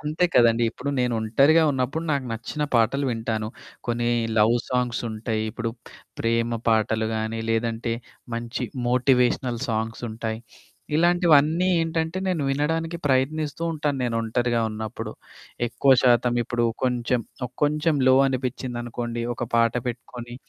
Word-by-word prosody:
అంతే 155 Hz, +4 st, 0 dB
కదండీ! 115 Hz, 0 st, +4 dB
ఇప్పుడు 140 Hz, +3 st, -4 dB
నేను 125 Hz, -1 st, +1 dB
ఒంటరిగా 140 Hz, +9 st, +4 dB
ఉన్నప్పుడు 135 Hz, +4 st, -1 dB
నాకు 140 Hz, -3 st, 0 dB
నచ్చిన 115 Hz, +7 st, -4 dB
పాటలు 120 Hz, +5 st, +3 dB
వింటాను. 110 Hz, -1 st, -2 dB, 0.4 s
కొన్ని 120 Hz, 0 st, 0 dB, 0.3 s
లవ్ 110 Hz, +3 st, +5 dB
సాంగ్స్ 125 Hz, -2 st, 0 dB
ఉంటాయి, 110 Hz, 0 st, -2 dB
ఇప్పుడు 115 Hz, +1 st, -3 dB, 0.5 s
ప్రేమ 115 Hz, 0 st, 0 dB
పాటలు 110 Hz, 0 st, +2 dB
గానీ, 110 Hz, +1 st, -2 dB
లేదంటే 115 Hz, +1 st, -1 dB, 0.4 s
మంచి 115 Hz, +2 st, -3 dB, 0.2 s
మోటివేషనల్ 125 Hz, -1 st, +2 dB
సాంగ్స్ 115 Hz, +1 st, -2 dB
ఉంటాయి. 110 Hz, 0 st, -4 dB, 0.6 s
ఇలాంటివన్నీ 170 Hz, -1 st, +4 dB
ఏంటంటే 165 Hz, +2 st, -1 dB
నేను 175 Hz, -6 st, 0 dB
వినడానికి 160 Hz, +4 st, -1 dB
ప్రయత్నిస్తూ 145 Hz, +4 st, 0 dB
ఉంటాను, 150 Hz, -3 st, -1 dB
నేను 120 Hz, -, -1 dB
ఒంటరిగా 120 Hz, +1 st, 0 dB
ఉన్నప్పుడు. 110 Hz, 0 st, -5 dB, 0.6 s
ఎక్కువ 120 Hz, +3 st, +3 dB
శాతం 120 Hz, -1 st, +4 dB
ఇప్పుడు 120 Hz, +1 st, -1 dB, 0.2 s
కొంచెం, 125 Hz, -1 st, +1 dB, 0.4 s
కొంచెం 150 Hz, +1 st, +2 dB
లో 130 Hz, -, +7 dB
అనిపిచ్చిందనుకోండి 120 Hz, -2 st, -3 dB
ఒక 120 Hz, -, -3 dB
పాట 115 Hz, -1 st, +4 dB
పెట్టుకొని, 120 Hz, 0 st, -6 dB
120 Hz, 125 wpm, -24 LUFS, 115-145 Hz, 0.6 s, లో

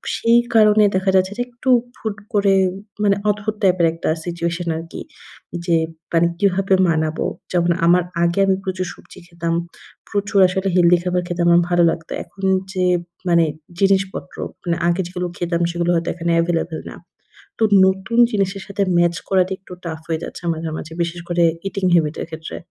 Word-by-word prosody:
সেই 230 Hz, +1 st, +4 dB, 0.2 s
কারণে 215 Hz, -1 st, +6 dB
দেখা 190 Hz, +1 st, +1 dB
যাচ্ছে 190 Hz, +1 st, +2 dB
যে -, -, -1 dB
একটু 245 Hz, +2 st, -5 dB, 0.3 s
হুট 215 Hz, -2 st, -4 dB, 0.2 s
করে 200 Hz, -1 st, +3 dB, 0.5 s
মানে 200 Hz, -1 st, +4 dB
অদ্ভুত 210 Hz, +1 st, -1 dB
টাইপের 180 Hz, -3 st, +4 dB
একটা 165 Hz, -, -3 dB, 0.2 s
সিচুয়েশন 170 Hz, 0 st, -3 dB
আরকি। 165 Hz, +1 st, -8 dB, 0.6 s
যে 170 Hz, -2 st, +2 dB, 0.4 s
মানে 170 Hz, 0 st, +4 dB
কিভাবে 195 Hz, 0 st, +2 dB, 0.2 s
মানাবো? 160 Hz, -1 st, 0 dB, 0.3 s
যেমন 175 Hz, -1 st, +2 dB
আমার 175 Hz, +1 st, +4 dB, 0.2 s
আগে 170 Hz, +3 st, +1 dB
আমি 190 Hz, -, +3 dB
প্রচুর 185 Hz, -1 st, -2 dB
সবজি -, -, -16 dB
খেতাম। 170 Hz, -1 st, -3 dB, 0.6 s
প্রচুর 200 Hz, 0 st, 0 dB
আসলে 190 Hz, +1 st, -2 dB
healthy 175 Hz, -1 st, +5 dB
খাবার 180 Hz, 0 st, 0 dB
খেতে 175 Hz, 0 st, -3 dB
আমার 170 Hz, 0 st, +6 dB
ভালো 175 Hz, -1 st, +3 dB
লাগতো। 165 Hz, -1 st, -7 dB
এখন 195 Hz, -, -15 dB, 0.3 s
যে 185 Hz, -1 st, 0 dB, 0.5 s
মানে 170 Hz, -1 st, +4 dB, 0.3 s
জিনিসপত্র 195 Hz, -1 st, 0 dB, 0.3 s
মানে 170 Hz, -2 st, 0 dB
আগে 175 Hz, +2 st, +1 dB
যেগুলো 180 Hz, 0 st, -4 dB
খেতাম 170 Hz, -1 st, -1 dB
সেগুলো 175 Hz, 0 st, 0 dB
হয়তো 165 Hz, 0 st, -1 dB
এখানে 170 Hz, 0 st, -2 dB
available 165 Hz, -1 st, -2 dB
না। -, -, -10 dB, 0.6 s
তো -, -, +4 dB, 0.2 s
নতুন 190 Hz, +5 st, -1 dB
জিনিসের 195 Hz, -1 st, -1 dB
সাথে 200 Hz, 0 st, -2 dB, 0.2 s
ম্যাচ 175 Hz, 0 st, +3 dB
করাটা 190 Hz, -1 st, +2 dB
একটু 185 Hz, -, -15 dB
টাফ 160 Hz, -2 st, -4 dB
হয়ে 160 Hz, -1 st, -1 dB
যাচ্ছে -, -, -8 dB
মাঝে, 160 Hz, 0 st, -5 dB
মাঝে 160 Hz, -, -8 dB
বিশেষ 170 Hz, +1 st, -4 dB
করে 175 Hz, -1 st, +1 dB, 0.2 s
eating 195 Hz, -1 st, -1 dB
habit 155 Hz, -2 st, +2 dB
এর -, -, -6 dB
ক্ষেত্রে। 160 Hz, 0 st, -7 dB
180 Hz, 170 wpm, -20 LUFS, 170-195 Hz, 0.6 s, কারণে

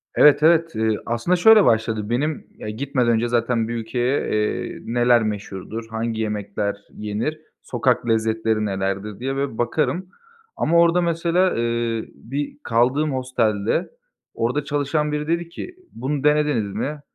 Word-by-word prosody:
Evet, 150 Hz, 0 st, +6 dB
Evet. 165 Hz, 0 st, +4 dB
Eee, 110 Hz, -1 st, +1 dB
aslında 120 Hz, +10 st, +1 dB
şöyle 215 Hz, +3 st, +7 dB
başladı. 110 Hz, -1 st, +1 dB
Benim; 145 Hz, +6 st, -1 dB
ya 105 Hz, -, -6 dB
gitmeden 125 Hz, +1 st, 0 dB
önce 115 Hz, +1 st, +1 dB
zaten 115 Hz, -1 st, +1 dB
bir 120 Hz, -, -3 dB
ülkeye, 120 Hz, +4 st, -1 dB
eee, 105 Hz, 0 st, -1 dB
neler 120 Hz, 0 st, +3 dB
meşhurdur, 105 Hz, +1 st, -5 dB
hangi 110 Hz, 0 st, -2 dB
yemekler 100 Hz, -1 st, -2 dB, 0.2 s
yenir, 105 Hz, +9 st, -3 dB, 0.2 s
sokak 120 Hz, 0 st, 0 dB
lezzetleri 110 Hz, -1 st, +1 dB
nelerdir 100 Hz, +1 st, -3 dB
diye 135 Hz, +2 st, -2 dB
bir 135 Hz, -4 st, -2 dB
bakarım. 160 Hz, +9 st, -1 dB, 0.5 s
Ama 170 Hz, +1 st, +2 dB
orada 170 Hz, +1 st, +4 dB
mesela, 170 Hz, +2 st, +1 dB
eee, 115 Hz, -1 st, -1 dB
bir 140 Hz, +5 st, -5 dB
kaldığım 130 Hz, +6 st, +2 dB
hostelde. 115 Hz, -5 st, 0 dB, 0.4 s
Orada 125 Hz, +6 st, -1 dB
çalışan 145 Hz, +1 st, -1 dB
biri 150 Hz, 0 st, -2 dB
dedi 170 Hz, 0 st, -1 dB
ki 360 Hz, -, -8 dB, 0.2 s
“Bunu 135 Hz, +4 st, -3 dB
denediniz 150 Hz, -9 st, +2 dB
mi?“ 150 Hz, 0 st, -3 dB
120 Hz, 140 wpm, -22 LUFS, 110-150 Hz, 0.5 s, şöyle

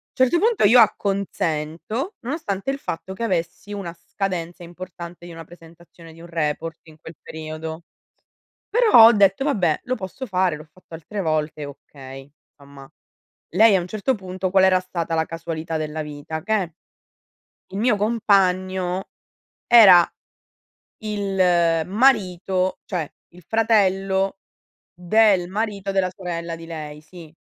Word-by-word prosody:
Certo 260 Hz, +6 st, +3 dB
punto 450 Hz, -, +2 dB
io 240 Hz, +4 st, +7 dB
acconsento, 200 Hz, -, -1 dB
nonostante 245 Hz, -, -4 dB
il 275 Hz, -, -1 dB
fatto 180 Hz, -6 st, -6 dB
che 230 Hz, -, -6 dB
avessi 185 Hz, +1 st, -3 dB
una 185 Hz, -4 st, -6 dB
scadenza 175 Hz, -2 st, -5 dB
importante 175 Hz, 0 st, -10 dB
di 175 Hz, -, -10 dB
una 165 Hz, 0 st, -9 dB
presentazione 165 Hz, -1 st, -16 dB
di 165 Hz, -, -17 dB
un 170 Hz, -, -11 dB
report 165 Hz, 0 st, -3 dB
in 160 Hz, -1 st, -17 dB
quel 160 Hz, -, -11 dB
periodo, 160 Hz, +1 st, -7 dB, 0.9 s
però 440 Hz, -, +6 dB
ho 235 Hz, -, +7 dB
detto: 200 Hz, +4 st, +3 dB
"Vabbè, 185 Hz, -, +1 dB
lo 255 Hz, -, -1 dB
posso 205 Hz, +7 st, -7 dB
fare, 185 Hz, -5 st, 0 dB
l'ho 155 Hz, -, -11 dB
fatto 165 Hz, +1 st, -17 dB
altre 170 Hz, +6 st, -6 dB
volte, 155 Hz, -2 st, -2 dB
okay". 135 Hz, -1 st, -12 dB, 0.3 s
Insomma. 140 Hz, -1 st, -15 dB, 0.6 s
Lei 215 Hz, +1 st, +6 dB
a -, -, +3 dB
un 175 Hz, -, -5 dB
certo 215 Hz, +6 st, -1 dB
punto 185 Hz, -1 st, -4 dB
qual 190 Hz, 0 st, +4 dB
era 185 Hz, -1 st, +4 dB
stata 170 Hz, -3 st, -3 dB
la 160 Hz, 0 st, +1 dB
casualità 165 Hz, -1 st, -5 dB
della 155 Hz, 0 st, -4 dB
vita? 150 Hz, +1 st, -6 dB
Che 210 Hz, -6 st, 0 dB, 1.0 s
il 195 Hz, -, -4 dB
mio 235 Hz, 0 st, +3 dB
compagno 190 Hz, -4 st, +1 dB, 0.6 s
era 195 Hz, -8 st, +8 dB, 1.0 s
il 185 Hz, -5 st, +1 dB
marito, 190 Hz, -5 st, +1 dB
cioè 170 Hz, -6 st, -4 dB, 0.2 s
il 175 Hz, +1 st, -17 dB
fratello 195 Hz, -3 st, +1 dB, 0.5 s
del 185 Hz, +1 st, +3 dB
marito 200 Hz, -1 st, -3 dB
della 190 Hz, -1 st, +1 dB
sorella 170 Hz, -3 st, -5 dB
di 165 Hz, -, -11 dB
lei. 150 Hz, -2 st, -7 dB
Sì, 160 Hz, 0 st, -14 dB
180 Hz, 140 wpm, -22 LUFS, 165-200 Hz, 1.0 s, era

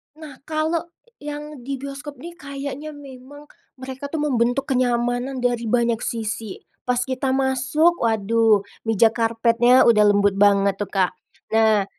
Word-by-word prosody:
Nah, 305 Hz, -4 st, -11 dB
kalau 315 Hz, +2 st, -1 dB, 0.3 s
yang 295 Hz, -2 st, -8 dB
di 275 Hz, -, -4 dB
bioskop 280 Hz, +1 st, -8 dB
nih 340 Hz, +1 st, -9 dB
kayaknya 280 Hz, +1 st, -7 dB
memang 285 Hz, +1 st, -13 dB, 0.3 s
mereka 265 Hz, +1 st, -7 dB
tuh 315 Hz, -2 st, -2 dB
membentuk 260 Hz, -1 st, 0 dB
kenyamanan 245 Hz, 0 st, 0 dB
dari 240 Hz, -1 st, 0 dB
banyak 235 Hz, 0 st, +1 dB
sisi, 225 Hz, -2 st, -4 dB, 0.2 s
pas 250 Hz, -1 st, +1 dB
kita 260 Hz, +1 st, -2 dB
masuk 270 Hz, +6 st, +2 dB
waduh 225 Hz, -1 st, +2 dB, 0.2 s
meja 225 Hz, 0 st, +4 dB
karpetnya 230 Hz, +2 st, +3 dB
udah 210 Hz, -2 st, +5 dB
lembut 200 Hz, -1 st, +2 dB
banget 200 Hz, -1 st, +3 dB
tuh, 205 Hz, -, -2 dB
Kak. 190 Hz, -2 st, +1 dB, 0.4 s
Nah, 220 Hz, -2 st, +3 dB
250 Hz, 135 wpm, -22 LUFS, 225-280 Hz, 0.4 s, udah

